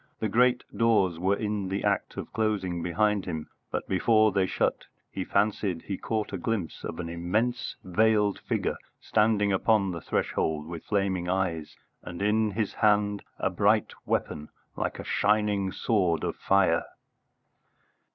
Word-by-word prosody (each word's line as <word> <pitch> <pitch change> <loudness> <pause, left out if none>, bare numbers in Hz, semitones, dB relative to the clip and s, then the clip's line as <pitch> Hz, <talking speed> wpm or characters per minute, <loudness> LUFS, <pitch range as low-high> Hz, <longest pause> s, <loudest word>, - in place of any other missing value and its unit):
The 110 - -1
great 125 +3 +3
doors 100 -7 +2
were 95 +3 +2
in 105 -2 -2
the 100 +1 -2
act - - 0
of - - -6
closing 100 -6 -1
behind 100 +4 +1
him, 80 -4 -5 0.2
but - - -3
before 110 +3 +3
they 95 -1 +1
shut - - -1 0.3
he - - -3
fancied 100 -5 0
he 100 - -3
caught 110 +1 -3
a 95 - -3
glimpse 100 -3 -3
of 80 - -5
an 85 - -3
immense 110 +9 -1
veiled 105 +2 +2
figure - - -2 0.2
standing 105 -2 +2
upon 100 0 +2
the 85 -2 -5
threshold, 75 -1 -1
with 85 0 -8
flaming 95 -4 0
eyes, 85 -5 -2 0.2
and 85 - -8
in 105 +2 +2
his 105 0 -2
hand 105 -1 +2 0.2
a - - 0
bright - - +2
weapon 75 0 -2 0.3
like - - -2
a - - -6
shining 105 -2 +1
sword 90 -8 +1
of - - -2
fire. 100 -1 +2
100 Hz, 150 wpm, -27 LUFS, 90-110 Hz, 0.3 s, great